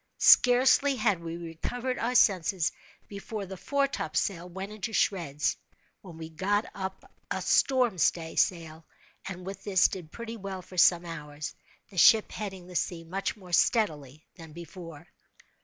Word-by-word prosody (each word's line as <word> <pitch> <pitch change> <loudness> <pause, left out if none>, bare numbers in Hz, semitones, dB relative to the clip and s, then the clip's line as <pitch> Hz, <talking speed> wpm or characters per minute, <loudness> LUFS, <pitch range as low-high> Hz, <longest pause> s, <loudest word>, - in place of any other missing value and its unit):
Scarcely 260 +3 +5
had 215 -6 +1
we 165 0 -6
recovered 235 +10 -4
our 240 +3 -1
senses, 185 -6 +3 0.4
before 200 +1 -6
the 190 0 -8
foretopsail 205 -8 -1
went 190 +3 -7
into 215 +2 -5
shreds, 160 -9 0 0.4
when 175 -4 -12
we 160 -1 -7
got 200 +6 -1
up 190 -1 -7 0.2
a - - -2
storm 250 -8 +2
stay 165 0 +1
sail 165 -2 0 0.4
and 180 -1 -7
with 195 +1 -7
this 190 -3 +4
did 175 -5 -8
pretty 230 0 -7
well 190 -2 -6
for 185 - -14
some 175 0 +5
hours, 150 -2 -7 0.4
the 185 - -3
ship 220 +4 +6
heading 190 -4 -6
the 180 0 -12
sea 170 -1 -2
much 190 +6 -3
more 180 -3 -13
steadily 155 - +1
than 165 -3 -12
before. 165 -1 -10
185 Hz, 150 wpm, -28 LUFS, 165-210 Hz, 0.4 s, ship